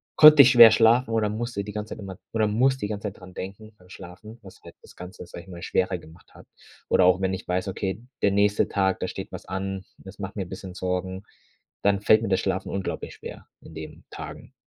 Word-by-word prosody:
konnte 155 -1 +10
ich 130 - +5
schwer 120 -3 +10
schlafen 115 +2 +4
oder 110 -2 +1
musste 110 -1 -4
die 105 - -7
ganze 105 +1 -6
Zeit - - -14
immer 95 -3 -8 0.2
oder 110 -1 +2
muss 130 +5 +2
die 105 - -3
ganze 105 0 -4
Zeit 100 - -8
daran 90 -1 -13
denken 100 +4 -8
beim 90 0 -21
Schlafen, 105 +6 -12
was 95 - -15
halt - - -13
das - - -17
Ganze, 90 +1 -10
sage 85 0 -10
ich 95 - -18
mal, 85 -1 -9
schwerer 95 0 0
gemacht 85 +1 -17
hat. - - -16 0.4
Oder - - +4
auch 90 +1 +4
wenn 95 0 0
ich 95 - -6
weiß, 90 +2 -1
okay, 95 +3 -4 0.2
der 100 - +3
nächste 100 +1 +2
Tag, 95 -1 0
da - - -1
steht - - -7
was - - -8
an, 95 0 -4
das 95 +1 -13
macht 95 +1 -6
mir 100 - -2
'n - - -15
bisschen 95 -1 -8
Sorgen, 95 +1 -3 0.6
dann 100 0 +2
fällt 110 +1 +5
mir 110 - -2
das 95 - +2
Schlafen 95 +1 -2
unglaublich 100 -1 -4
schwer - - -10
in 80 - -14
den 80 -1 -9
Tagen. - - -9
100 Hz, 235 wpm, -25 LUFS, 95-110 Hz, 0.6 s, konnte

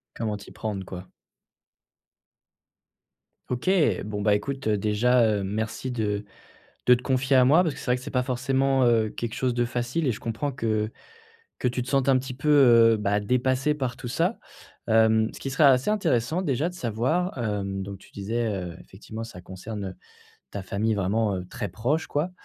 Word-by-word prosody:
Comment 110 -2 -2
t'y 100 - -12
prendre, 100 -4 -4
quoi. 90 0 -8 2.4
OK! 125 +8 -1 0.4
Bon, 105 -1 -4
bah, 105 -1 +4
écoute 135 +4 -2
déjà, 110 +4 +3
heu, 105 -3 +1
merci 110 +5 -3
de 105 -3 -2 0.6
de 125 - +8
te 125 - -4
confier 130 +1 +2
à 125 - +6
moi 155 +7 +6
parce 160 -5 -2
que - - -9
c'est - - -9
vrai 125 0 +3
que 125 - -9
c'est 145 - -7
pas 125 -2 0
forcément, 135 +1 +1
heu, 115 -2 +3
quelque 120 -1 -5
chose 125 -1 0
de 120 0 +1
facile 125 +5 -1
et - - +3
je 110 - -7
comprends 115 +5 -3
que 110 -4 -1 0.7
que 125 - +1
tu 125 +1 -2
te 125 - -9
sentes 135 -1 +1
un 130 - +5
petit 130 0 -6
peu, 135 +4 -4
heu, 115 -5 +6
bah 105 0 +1
dépassée 130 +6 +1
par 130 -5 -3
tout - - -8
ça. 165 - 0 0.5
Hem, 110 0 +4
ce - - -11
qui - - -4
serait 135 +3 +2
assez 135 +4 +5
intéressant, 165 - +1
déjà 145 0 0
de 180 - -9
savoir, 145 - -1
heu 105 -3 -1
donc 95 0 -4
tu - - -19
disais, 115 +4 -2
heu, 90 -4 -4
effectivement 110 +3 -9
ça 115 -6 -10
concerne, 100 +3 -7
heu, 95 - -6 0.6
ta 100 +4 -6
famille 105 +3 -1
vraiment, 100 +1 0
heu, 90 -1 -5
très 100 -1 -5
proche, 125 - -1
quoi. 155 +5 -1
120 Hz, 190 wpm, -26 LUFS, 105-130 Hz, 2.4 s, de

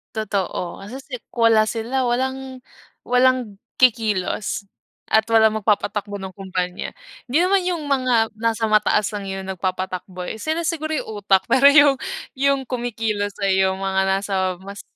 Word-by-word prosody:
Totoo. 195 -4 -3
Kasi 210 +7 -8
si 275 - -15 0.2
kung 230 -1 +1
wala 215 0 +4
sila, 235 +4 -2
walang 260 +1 -2 0.4
walang 250 -5 +2 0.2
kikilos 215 -5 +1 0.4
at 220 0 +4
walang 220 -1 +4
magpapatakbo 205 0 0
ng 190 -1 -7
kumpanya. 185 -2 -4 0.3
Hindi 255 +5 0
naman 380 +2 +3
yung 345 -4 -1
mga 250 -5 +2
nasa 225 0 0
mataas 210 -1 +3
lang 205 -1 -4
yung 190 0 -5
nagpapatakbo 185 0 -4
eh. 220 - -5
Sila 315 +2 -1
siguro 315 -1 -2
yung - - -5
utak 195 -1 +3
pero 265 +1 +4
yung 285 -1 +6 0.4
yung 275 -1 +1
kumikilos 225 -4 -2
ay 190 -1 +2
yung 190 0 0
mga 190 0 +1
nasa 195 +1 -1 0.3
mas 200 +1 -9
220 Hz, 150 wpm, -21 LUFS, 195-255 Hz, 0.4 s, yung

